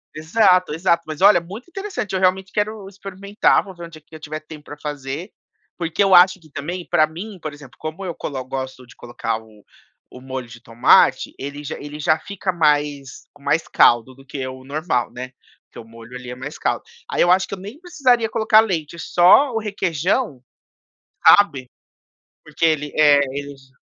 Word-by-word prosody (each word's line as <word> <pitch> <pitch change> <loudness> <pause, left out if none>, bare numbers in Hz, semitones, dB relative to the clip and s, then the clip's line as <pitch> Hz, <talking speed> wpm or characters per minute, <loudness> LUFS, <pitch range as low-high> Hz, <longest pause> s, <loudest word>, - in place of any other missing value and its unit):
Exato, 180 +1 +3
exato. 170 0 +1
Mas 155 0 -7
olha, 200 -2 +7
muito 195 - -10
interessante, 390 - -5
eu 190 - 0
realmente 190 +1 +1
quero 210 -1 -2
experimentar, 200 +1 0
vou 190 -2 -12
ver 175 -1 -8
um - - -11
dia 155 -2 -14
que 155 - -16
eu - - -10
tiver 155 0 -6
tempo 155 -1 -13
pra 145 - -10
fazer, 145 +4 -6 0.5
porque 170 +3 0
eu 195 -2 +5
acho 185 +2 +6
que 155 -3 -20
também 170 +6 -5
pra 165 -3 +4
mim, 185 +6 -9
por 155 -2 -6
exemplo, 140 -4 -14
como 160 +5 -6
eu 175 -3 -4
colo 135 -3 -5
gosto 130 0 -6
de - - -17
colocar 120 -2 -4
o 110 -2 -20 0.5
o 125 - -11
molho 130 -1 -6
de 115 +1 -13
tomate, 115 0 +3
ele 140 +2 -7
já 145 - -5
ele 145 +1 -8
já 155 +1 +2
fica 195 +1 -4
mais 145 -5 0
com 145 - -22
mais 160 +3 0
caldo 120 +2 +3
do 135 +1 -18
que 135 0 -5
o 130 0 -9
normal, 140 -2 -2
né, 125 +1 -7 0.3
porque - - -18
o 115 - -9
molho, 115 +2 -13
ele 125 -1 -8
é 125 - -6
mais 135 +4 -8
caldo, - - -1 0.3
aí - - -1
eu 175 - +4
acho 185 +1 +4
que - - -8
eu 195 - -5
nem 205 +10 -10
precisaria 270 -10 +1
colocar 220 -1 +4
leite, 170 -6 -3
só 180 - +5
o 225 - 0
requeijão, 190 - -1 0.8
sabe, 140 -11 +5 0.7
porque - - -2
ele, 150 -2 +1
eh, 145 -2 +6
ele 140 +1 -6
j 135 -1 -23
155 Hz, 200 wpm, -21 LUFS, 135-190 Hz, 0.8 s, olha